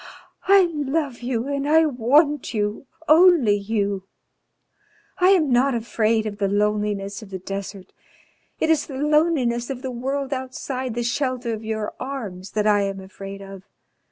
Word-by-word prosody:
I 395 0 +7
love 290 -2 -2
you 245 0 -2
and 280 0 -2
I 320 +1 +5
want 285 +1 +2
you 210 +5 -2 0.2
only 320 - +6
you. 200 -1 -1 1.2
I 365 +1 +5
am 335 -8 +4
not 255 +2 +3
afraid 225 -1 0
of 205 -1 -5
the 200 - +1
loneliness 205 0 -1
of 215 - -11
the 190 - -5
desert, 195 0 -7 0.7
it 320 - +2
is 320 - +1
the 270 - -7
loneliness 290 -5 +1
of 260 -2 -5
the 260 - -3
world 270 +3 -3
outside 260 -1 -4
the 240 - -1
shelter 245 -1 -1
of 220 0 -6
your 220 -1 -3
arms 205 -9 -6
that 210 -1 0
I 205 -1 +4
am 195 -1 -2
afraid 195 +1 -9
of. 195 -1 -10
240 Hz, 155 wpm, -23 LUFS, 205-280 Hz, 1.2 s, I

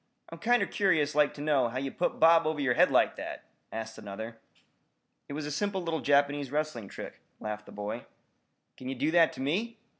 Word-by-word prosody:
I'm - - -8
kinder 240 -2 +3
curious 155 -7 +2
like 150 -1 +3
to 145 - -8
know 145 -5 +2
how 125 - -5
ye 135 +1 -2
put 175 - -1
Bob 165 0 +6
over 155 -1 -1
yer 135 -3 +2
head - - +5
like - - +3
that!" - - -6 0.3
asked 110 0 -6
another. 110 +2 -7 0.9
"It - - -5
was 150 +1 -4
a 150 - -4
simple 190 +4 -1
little 165 -1 -1
Japanese 145 -1 +2
wrestling 150 -8 -2
trick," - - -9 0.2
laughed 105 -1 -5
the - - -11
boy. 105 +1 -5 0.7
"Kin 130 - -7
ye 135 - -3
do 145 +5 0
that 170 -1 +5
to - - -7
me?" 210 - -1
145 Hz, 205 wpm, -30 LUFS, 125-160 Hz, 0.9 s, Bob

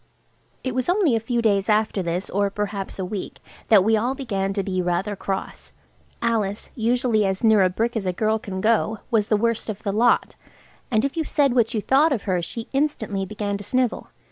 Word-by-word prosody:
It 260 - -2
was 255 +3 -1
only 355 - +3
a - - +2
few 235 +1 -1
days 200 -2 +2
after 215 -2 +2
this, 175 +2 -2
or 200 +1 +1
perhaps 200 -1 -4
a 190 - -3
week, 195 +1 -5 0.3
that 210 -4 +6
we 220 +2 +3
all 240 +5 0
began 195 -8 -2
to 195 -1 -1
be 185 -1 -1
rather 180 +4 -1
cross. 195 0 -5 0.5
Alice, 215 -3 -1
usually 235 -1 +1
as 190 +1 -1
near 220 -2 +5
a 185 - +4
brick 230 +6 -1
as 205 -4 -2
a - - +2
girl 215 +4 0
can 190 -3 -5
go, 220 0 +2
was 215 -3 +2
the 215 - +2
worst 230 +1 0
of 210 -1 -5
the 200 - -1
lot, 235 +3 +2 0.5
and 220 +1 +2
if 275 - -3
you 325 - 0
said 285 -4 +2
what 235 -1 +2
you 215 - 0
thought 285 +8 +3
of 240 -7 -1
her 185 -3 0
she 225 +7 -5
instantly 220 -9 -1
began 205 -1 -3
to - - -8
snivel. 250 +3 -1
215 Hz, 215 wpm, -23 LUFS, 195-235 Hz, 0.5 s, that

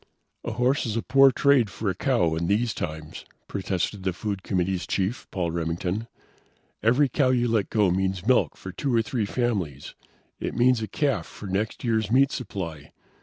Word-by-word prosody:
"A 115 - -3
horse 125 +3 +1
is 110 0 -2
a 115 - -1
poor 135 -1 +6
trade 130 -4 +3
for 105 +2 -5
a 95 - +2
cow 90 - +1
in 85 +1 -1
these 110 +4 +1
times," 80 +1 -6 0.2
protested 95 0 -2
the 95 -1 -1
food 100 +1 -4
committee's 95 -1 -1
chief, 100 +6 -2
Paul 85 -3 -2
Remington. 85 +6 -2 0.7
"Every 125 +6 +4
cow 130 +1 +2
you 120 -1 +2
let 110 -4 +1
go 105 -4 +3
means 95 0 -1
milk 125 +1 +3
for 95 - -8
two 125 +8 -1
or 115 - +3
three 110 -2 -2
families. 95 - -2 0.5
It - - -4
means 125 -1 +3
a 110 - -3
calf 135 - -1
for - - -11
next 100 +3 -2
year's 110 -3 +1
meat 135 +4 +4
supply. 85 - -5
105 Hz, 180 wpm, -25 LUFS, 90-120 Hz, 0.7 s, poor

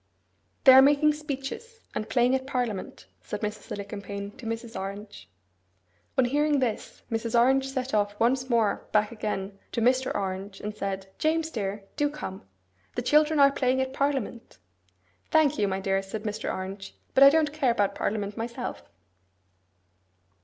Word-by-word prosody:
'They 265 - +9
are 265 - +10
making 290 +2 +5
speeches, 300 - -6
and 215 - -4
playing 245 +2 +3
at 265 0 -1
parliament,' 245 -7 -3 0.2
said 210 - -6
Mrs. 210 0 -5
Alicumpaine 200 0 -6
to 250 -3 -8
Mrs. 230 0 -5
Orange. 200 +2 -7 0.9
On 260 - +5
hearing 295 +3 +2
this, 245 -5 -3
Mrs. 230 +1 +1
Orange 265 +2 +3
set 265 -1 -3
off 205 -1 0
once 255 +3 +2
more 230 -4 +1
back 210 +1 +2
again 205 -3 -4
to - - -2
Mr. 255 +3 +2
Orange, 195 0 -4
and 210 0 -5
said, 195 -2 -3
'James 320 +1 +1
dear, 200 -3 -3
do 295 -1 +2
come. 190 -11 -7 0.5
The 245 - -2
children 300 +3 +4
are 280 0 +7
playing 260 -1 +1
at 260 0 -1
parliament.' 270 -5 -2 0.7
'Thank 305 -2 +3
you, 205 - +2
my 190 0 -1
dear,' 195 0 0
said 200 +2 -6
Mr. 215 0 -3
Orange, 195 +1 -6 0.2
'but 270 - +7
I 275 - +11
don't 300 -1 +2
care 295 -5 +1
about 205 -4 +1
parliament 205 -1 -2
myself. 235 +2 -5
235 Hz, 160 wpm, -27 LUFS, 205-270 Hz, 0.9 s, I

